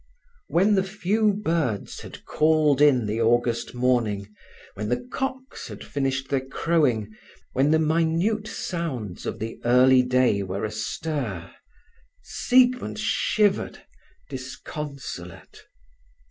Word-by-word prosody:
When 195 Hz, +5 st, +3 dB
the 195 Hz, -, +4 dB
few 210 Hz, +2 st, +1 dB
birds 165 Hz, -, -2 dB
had -, -, -11 dB
called 155 Hz, -2 st, +3 dB
in 135 Hz, -6 st, +5 dB
the 110 Hz, +2 st, -1 dB
August 120 Hz, +1 st, +1 dB
morning, 115 Hz, -5 st, 0 dB, 0.4 s
when 105 Hz, +1 st, -4 dB
the 125 Hz, -, -2 dB
cocks 260 Hz, -1 st, -4 dB
had -, -, -9 dB
finished 135 Hz, -1 st, -2 dB
their 135 Hz, -2 st, 0 dB
crowing, 130 Hz, -7 st, 0 dB, 0.4 s
when 135 Hz, +3 st, +2 dB
the 160 Hz, -, +4 dB
minute 165 Hz, +7 st, +1 dB
sounds 130 Hz, -, -4 dB
of -, -, -3 dB
the 110 Hz, +1 st, -6 dB
early 125 Hz, +2 st, +6 dB
day 125 Hz, -5 st, +2 dB
were 95 Hz, +2 st, -3 dB
astir, 110 Hz, -, -4 dB, 0.7 s
Siegmund 250 Hz, -, +2 dB
shivered 210 Hz, -1 st, +1 dB, 0.4 s
disconsolate. 130 Hz, -, -8 dB
135 Hz, 110 wpm, -25 LUFS, 115-170 Hz, 0.7 s, early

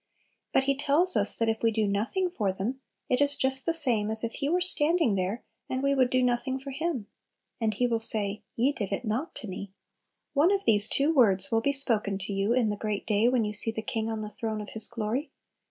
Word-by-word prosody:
But 265 Hz, -, +1 dB
He 275 Hz, 0 st, -1 dB
tells 295 Hz, +7 st, +1 dB
us 205 Hz, 0 st, +1 dB
that 230 Hz, -, -1 dB
if 220 Hz, 0 st, -2 dB
we 230 Hz, -, +1 dB
do 220 Hz, -1 st, -1 dB
nothing 230 Hz, -, -3 dB
for 210 Hz, -, -2 dB
them, 220 Hz, +8 st, -6 dB, 0.3 s
it 250 Hz, +2 st, -1 dB
is 285 Hz, 0 st, +8 dB
just 265 Hz, +2 st, 0 dB
the 330 Hz, -, +1 dB
same 235 Hz, -9 st, 0 dB
as 220 Hz, +1 st, -3 dB
if 230 Hz, -, -3 dB
He 280 Hz, -, -4 dB
were 355 Hz, +3 st, 0 dB
standing 330 Hz, -, +2 dB
there 195 Hz, +5 st, -4 dB, 0.3 s
and 260 Hz, +1 st, -4 dB
we 275 Hz, 0 st, +1 dB
would 260 Hz, -2 st, +1 dB
do 255 Hz, 0 st, 0 dB
nothing 250 Hz, +2 st, -2 dB
for 275 Hz, +1 st, -10 dB
Him. 285 Hz, -5 st, -4 dB, 0.5 s
And 220 Hz, -3 st, -2 dB
He 245 Hz, -, -1 dB
will 230 Hz, -2 st, -1 dB
say, 210 Hz, -2 st, +2 dB
"Ye 250 Hz, +5 st, 0 dB
did 205 Hz, -7 st, -6 dB
it 200 Hz, +5 st, -4 dB
not 240 Hz, +10 st, -4 dB
to 220 Hz, -, -9 dB
me." 190 Hz, +1 st, -9 dB, 0.6 s
One 300 Hz, +6 st, +2 dB
of 400 Hz, -1 st, -2 dB
these 210 Hz, -1 st, +6 dB
two 290 Hz, +4 st, 0 dB
words 200 Hz, -9 st, +2 dB
will 225 Hz, 0 st, 0 dB
be 280 Hz, -, 0 dB
spoken 225 Hz, -8 st, +7 dB
to 195 Hz, +1 st, -7 dB
you 195 Hz, +3 st, -2 dB
in 240 Hz, -3 st, 0 dB
the 205 Hz, -, -5 dB
great 210 Hz, -1 st, -5 dB
day 215 Hz, +1 st, 0 dB
when 245 Hz, -3 st, 0 dB
you 210 Hz, -, -5 dB
see 210 Hz, +2 st, +6 dB
the 220 Hz, -1 st, -5 dB
King 220 Hz, 0 st, -4 dB
on 220 Hz, -1 st, -5 dB
the 210 Hz, -, -7 dB
throne 220 Hz, 0 st, -6 dB
of 210 Hz, -, -9 dB
His 220 Hz, -, +6 dB
glory. 235 Hz, +5 st, -4 dB
230 Hz, 245 wpm, -26 LUFS, 210-275 Hz, 0.6 s, is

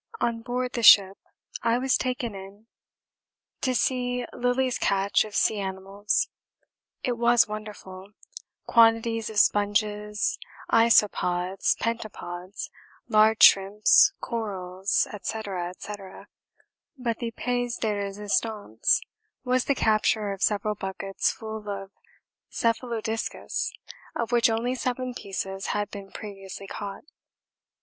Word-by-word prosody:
On 230 Hz, -1 st, -1 dB
board 250 Hz, +1 st, -3 dB
the 240 Hz, -, -2 dB
ship 200 Hz, -3 st, +7 dB, 0.4 s
I 230 Hz, +1 st, +2 dB
was 260 Hz, +1 st, +2 dB
taken 250 Hz, -3 st, -2 dB
in 195 Hz, +2 st, -11 dB, 1.0 s
to 255 Hz, -1 st, 0 dB
see 250 Hz, -1 st, 0 dB
Lillie's 250 Hz, +1 st, 0 dB
catch 200 Hz, 0 st, +2 dB
of 215 Hz, -1 st, -9 dB
sea 215 Hz, -, +2 dB
animals. 195 Hz, +1 st, -1 dB, 0.8 s
It 245 Hz, -2 st, -1 dB
was 235 Hz, 0 st, +4 dB
wonderful, 210 Hz, -2 st, -9 dB, 0.5 s
quantities 225 Hz, -1 st, +3 dB
of 215 Hz, -, -7 dB
sponges, 210 Hz, 0 st, +1 dB, 0.3 s
isopods, 195 Hz, -5 st, +3 dB
pentapods, 200 Hz, -5 st, -5 dB, 0.4 s
large 220 Hz, 0 st, +4 dB
shrimps, 195 Hz, +2 st, +6 dB
corals, 195 Hz, -4 st, -2 dB
&c., 220 Hz, -, -3 dB
&c. 185 Hz, -2 st, -5 dB, 1.1 s
but 235 Hz, -3 st, -2 dB
the 235 Hz, -2 st, -3 dB
pièce 245 Hz, 0 st, -2 dB
de 220 Hz, -, 0 dB
résistance 205 Hz, -, 0 dB, 0.4 s
was 255 Hz, 0 st, +1 dB
the 280 Hz, -, +1 dB
capture 215 Hz, -2 st, +1 dB
of 195 Hz, -1 st, -6 dB
several 210 Hz, 0 st, +1 dB
buckets 195 Hz, -1 st, -2 dB
full 220 Hz, -1 st, -7 dB
of 195 Hz, -1 st, -5 dB, 0.6 s
cephalodiscus 230 Hz, -1 st, -2 dB, 0.5 s
of 235 Hz, 0 st, -2 dB
which 240 Hz, -1 st, +4 dB
only 230 Hz, +3 st, 0 dB
seven 255 Hz, 0 st, -3 dB
pieces 195 Hz, -3 st, -5 dB
had 205 Hz, 0 st, -2 dB
been 200 Hz, -1 st, -8 dB
previously 195 Hz, -2 st, -8 dB
caught. 200 Hz, 0 st, -7 dB
215 Hz, 110 wpm, -26 LUFS, 195-235 Hz, 1.1 s, ship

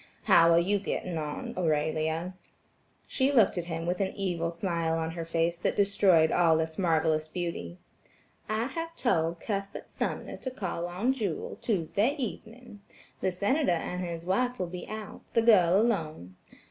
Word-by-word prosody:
How 165 Hz, 0 st, +6 dB
are 165 Hz, -, +6 dB
you 200 Hz, +4 st, +1 dB
getting 180 Hz, -3 st, -3 dB
on, 150 Hz, -1 st, -5 dB
Aurelia?" 160 Hz, +1 st, 0 dB, 0.7 s
She 265 Hz, +1 st, +1 dB
looked 230 Hz, -8 st, +4 dB
at 170 Hz, -, -4 dB
him 165 Hz, -1 st, -4 dB
with 180 Hz, +2 st, -1 dB
an 190 Hz, -, -1 dB
evil 175 Hz, -4 st, -1 dB
smile 170 Hz, -2 st, -1 dB
on 160 Hz, 0 st, -2 dB
her 165 Hz, 0 st, -5 dB
face 165 Hz, +1 st, 0 dB
that -, -, 0 dB
destroyed 195 Hz, -5 st, +4 dB
all 165 Hz, -2 st, +4 dB
its 160 Hz, +1 st, -3 dB
marvelous 160 Hz, -3 st, +1 dB
beauty: 160 Hz, -, -5 dB, 0.7 s
"I 215 Hz, +1 st, 0 dB
have 330 Hz, +6 st, -5 dB
told 165 Hz, -8 st, 0 dB
Cuthbert 200 Hz, -1 st, -5 dB
Sumner -, -, -3 dB
to 260 Hz, -, -5 dB
call 185 Hz, -8 st, -4 dB
on 195 Hz, +9 st, 0 dB
Jewel, 205 Hz, -11 st, -4 dB
Tuesday 200 Hz, -, 0 dB
evening. 235 Hz, -4 st, -7 dB, 0.4 s
The -, -, +1 dB
Senator 205 Hz, -, +1 dB
and 180 Hz, +2 st, -3 dB
his 170 Hz, -1 st, -5 dB
wife 245 Hz, +7 st, 0 dB
will 180 Hz, -, -1 dB
be 180 Hz, +1 st, -7 dB
out, 215 Hz, -1 st, -7 dB
the 230 Hz, -, +4 dB
girl 190 Hz, -5 st, +6 dB
alone. 155 Hz, -, -1 dB
175 Hz, 160 wpm, -29 LUFS, 165-210 Hz, 0.7 s, How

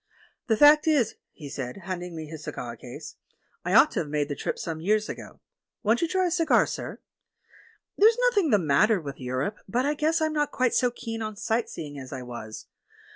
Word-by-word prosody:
"The 220 Hz, -2 st, +2 dB
fact 295 Hz, +3 st, +7 dB
is," 275 Hz, -8 st, +3 dB, 0.2 s
he 150 Hz, -, -10 dB
said, 135 Hz, +5 st, -6 dB
handing 180 Hz, -1 st, -5 dB
me 160 Hz, -1 st, -5 dB
his 155 Hz, 0 st, -9 dB
cigar 120 Hz, -1 st, -5 dB
case, -, -, -10 dB, 0.5 s
"I -, -, 0 dB
ought -, -, +7 dB
to -, -, -1 dB
have 150 Hz, -, -3 dB
made 145 Hz, -1 st, -1 dB
the 145 Hz, -, -2 dB
trip -, -, -3 dB
some 160 Hz, -1 st, -5 dB
years 215 Hz, +4 st, +1 dB
ago. -, -, -9 dB, 0.2 s
— -, -, -60 dB
Won't 225 Hz, +2 st, +2 dB
you 335 Hz, -, +2 dB
tiy 370 Hz, +2 st, +1 dB
a 350 Hz, -, 0 dB
cigar, 330 Hz, -2 st, +3 dB
sir? -, -, -6 dB, 0.5 s
— -, -, -28 dB
There's 445 Hz, +3 st, +6 dB
noth -, -, 0 dB
ing 335 Hz, -6 st, +1 dB
the 210 Hz, -, +5 dB
matter 190 Hz, +6 st, +3 dB
with 140 Hz, -4 st, -7 dB
Europe, 130 Hz, +10 st, -3 dB
but 245 Hz, +6 st, +1 dB
I 295 Hz, -, +2 dB
guess 315 Hz, +2 st, +1 dB
I'm 315 Hz, -1 st, 0 dB
not 295 Hz, -1 st, +1 dB
quite 255 Hz, -1 st, +1 dB
so 250 Hz, -, +3 dB
keen 225 Hz, -1 st, -6 dB
on 215 Hz, -1 st, -4 dB
sight 225 Hz, +3 st, -1 dB
seeing 145 Hz, -3 st, -7 dB
as 130 Hz, -1 st, -9 dB
I 130 Hz, -2 st, -5 dB
was. 120 Hz, -3 st, -8 dB
210 Hz, 225 wpm, -26 LUFS, -, 0.5 s, fact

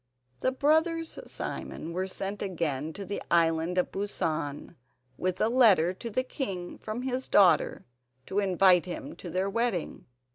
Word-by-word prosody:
The 260 Hz, -, +1 dB
brothers 320 Hz, +4 st, +1 dB
Simon 165 Hz, -, -5 dB
were 185 Hz, +2 st, -1 dB
sent 195 Hz, +2 st, -5 dB
again 160 Hz, -6 st, -2 dB
to 200 Hz, +2 st, -7 dB
the 200 Hz, +2 st, -4 dB
Island 165 Hz, +1 st, +2 dB
of 180 Hz, -, +1 dB
Busan 160 Hz, -7 st, -3 dB, 0.4 s
with 185 Hz, +4 st, -2 dB
a -, -, +3 dB
letter 210 Hz, -9 st, +5 dB
to 230 Hz, +5 st, -6 dB
the 255 Hz, +4 st, 0 dB
king 190 Hz, -10 st, -4 dB
from 220 Hz, +3 st, -5 dB
his 260 Hz, 0 st, -2 dB
daughter 195 Hz, -3 st, +4 dB, 0.4 s
to 195 Hz, -, -1 dB
invite 185 Hz, -2 st, +4 dB
him 175 Hz, -, -6 dB
to 180 Hz, -, -8 dB
their 185 Hz, +3 st, 0 dB
wedding. 220 Hz, -4 st, -2 dB
190 Hz, 150 wpm, -29 LUFS, 175-230 Hz, 0.4 s, letter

